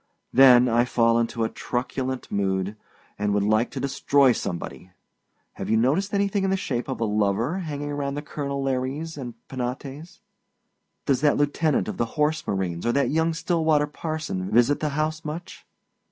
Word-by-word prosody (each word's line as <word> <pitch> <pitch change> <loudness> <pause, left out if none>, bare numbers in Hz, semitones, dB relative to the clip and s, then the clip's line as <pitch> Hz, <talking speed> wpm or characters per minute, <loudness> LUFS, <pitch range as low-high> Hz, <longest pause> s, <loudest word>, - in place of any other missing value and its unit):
Then 125 -1 +7
I 120 0 +3
fall 115 -1 +2
into 115 0 -1
a 110 - 0
truculent 130 +1 -3
mood, 95 0 -1 0.4
and 105 0 +1
would 100 - +2
like 110 +3 +2
to - - -6
destroy 140 0 +3
somebody. 90 -4 -5 0.6
Have - - -6
you 110 - +3
noticed 150 - +1
anything 200 0 +1
in 195 - +1
the 195 - +1
shape 125 -9 -3
of 130 - -4
a 115 - +1
lover 105 - 0
hanging 145 -4 -4
around 140 -1 -2
the 145 - -4
colonel 140 -2 -4
Lares 135 +5 -2
and 125 -5 -7
Penates? 135 +5 -6 0.9
Does 135 -2 +1
that 150 -1 +3
lieutenant 145 +1 +1
of - - -4
the 120 - +1
horse 150 +1 +1
marines 90 -4 -2
or 120 - +2
that 140 - +2
young 160 +1 +1
Stillwater 160 -3 +2
parson 150 - -4
visit 120 +5 +3
the 155 - -1
house 155 +2 -2
much? 155 +3 -7
135 Hz, 170 wpm, -25 LUFS, 115-155 Hz, 0.9 s, Then